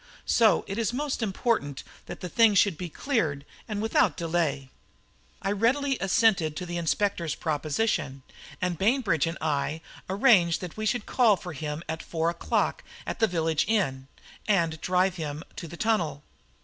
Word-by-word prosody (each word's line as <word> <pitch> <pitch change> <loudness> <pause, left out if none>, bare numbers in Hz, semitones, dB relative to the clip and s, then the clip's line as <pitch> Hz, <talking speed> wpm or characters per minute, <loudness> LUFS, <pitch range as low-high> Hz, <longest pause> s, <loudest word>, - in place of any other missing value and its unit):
So 225 -3 +4
it 195 +3 -3
is 230 +1 0
most 280 0 -2
important 195 - -1 0.2
that - - -8
the 180 - -4
thing 220 +3 +4
should 195 -2 +4
be 175 +2 -6
cleared, 155 - -1 0.2
and 210 -1 -3
without 225 - +2
delay." 160 -6 -1 0.7
I 195 - 0
readily 260 +6 +1
assented 190 -6 +2
to 180 - -4
the 175 0 -4
inspector's 170 -1 0
proposition, 150 -3 -1 0.4
and 180 -3 -2
Bainbridge 200 - +2
and 165 - -3
I 150 0 -1 0.3
arranged 190 -5 +4
that 180 -3 -7
we 215 0 -2
should 215 0 0
call 235 -5 +4
for 180 -2 -8
him 150 +1 -5
at 160 +1 -4
four 165 0 -1
o'clock 170 - -1 0.2
at - - -4
the 225 - +4
village 165 -4 0
inn 135 -12 0 0.4
and 165 -6 +1
drive 185 0 +1
him 155 -1 -5
to 170 - -6
the 170 +2 -10
tunnel. 170 -10 0
180 Hz, 160 wpm, -27 LUFS, 160-215 Hz, 0.7 s, So